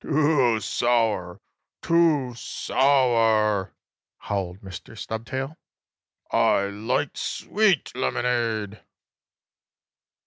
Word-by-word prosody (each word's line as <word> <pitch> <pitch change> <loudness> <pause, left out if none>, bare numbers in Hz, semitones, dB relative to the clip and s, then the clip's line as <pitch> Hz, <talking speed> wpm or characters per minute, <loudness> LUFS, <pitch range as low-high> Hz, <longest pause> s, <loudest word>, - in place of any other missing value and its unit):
"Too 145 -6 +2
sour! 110 -5 0 0.4
Too 160 -7 +2
sour!" 115 -6 +1 0.4
howled 95 -2 -4
Mr. 95 +3 -10
Stubtail. 130 +7 -5 0.8
"I 100 - +3
like 105 +2 -2
sweet 205 - 0
lemonade!" 110 - -1
115 Hz, 65 wpm, -24 LUFS, 105-135 Hz, 0.8 s, I